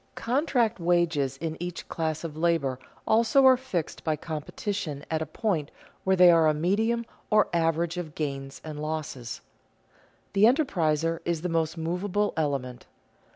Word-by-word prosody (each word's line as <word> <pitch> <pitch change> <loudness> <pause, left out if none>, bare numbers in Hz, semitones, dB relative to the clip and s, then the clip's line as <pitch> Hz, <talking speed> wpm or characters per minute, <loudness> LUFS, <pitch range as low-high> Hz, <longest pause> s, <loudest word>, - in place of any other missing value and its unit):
Contract 240 - +1
wages 165 -6 +1
in 160 +2 -4
each 175 0 -5
class 160 -1 -2
of 160 -3 -5
labor 155 -6 +1 0.3
also 235 +5 +4
are 260 -1 +8
fixed 220 -11 -4
by 155 -1 +1
competition 155 0 -4
at 160 0 0
a 160 - -3
point 170 -10 -1 0.3
where 190 0 +3
they 180 -1 +8
are 165 -2 +5
a 155 - +3
medium 220 +9 +1 0.2
or 215 0 +4
average 165 +1 +1
of 160 -4 -5
gains 135 -2 -4
and 150 -1 -6
losses. 150 -6 -4 0.9
The 200 +2 +5
enterpriser 165 - +2
is 170 -1 -2
the 180 - -1
most 165 0 0
movable 180 +5 -1
element. 135 -5 -2
165 Hz, 150 wpm, -27 LUFS, 155-195 Hz, 0.9 s, are